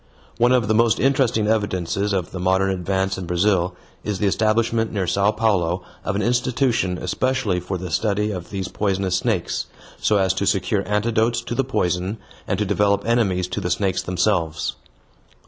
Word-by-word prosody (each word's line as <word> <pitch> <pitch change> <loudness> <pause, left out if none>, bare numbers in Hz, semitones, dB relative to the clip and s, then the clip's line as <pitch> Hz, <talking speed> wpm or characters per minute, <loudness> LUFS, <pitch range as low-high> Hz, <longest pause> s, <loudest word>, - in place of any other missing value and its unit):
One 120 +1 +4
of 125 -4 +3
the 110 - +2
most 115 0 +3
interesting 130 -4 +2
evidences 105 -2 0
of 95 -4 -1
the 95 - -6
modern 95 +1 +2
advance 95 +1 -1
in 90 - -6
Brazil 90 0 +1 0.3
is 105 -2 -2
the 105 - -1
establishment 110 +2 +1
near 100 -3 -1
Sao 100 +3 +2
Paulo 95 -5 +1 0.2
of 100 - -2
an 105 - 0
institution 120 -6 +1
especially 130 -5 0
for 90 +1 -4
the 90 -1 -6
study 105 +4 0
of 90 -4 -6
these 95 -2 -4
poisonous 95 -2 0
snakes, - - -1 0.3
so 105 - +2
as 95 -1 +2
to 95 +1 -2
secure 95 +1 +1
antidotes 110 +3 +1
to 120 - -5
the 135 - +1
poison 95 -5 -1 0.3
and 95 - 0
to 105 - 0
develop 100 0 +1
enemies 100 -6 +1
to 100 +2 -3
the 90 - -2
snakes 95 -1 0
themselves. 90 -3 0
100 Hz, 175 wpm, -22 LUFS, 95-110 Hz, 0.3 s, One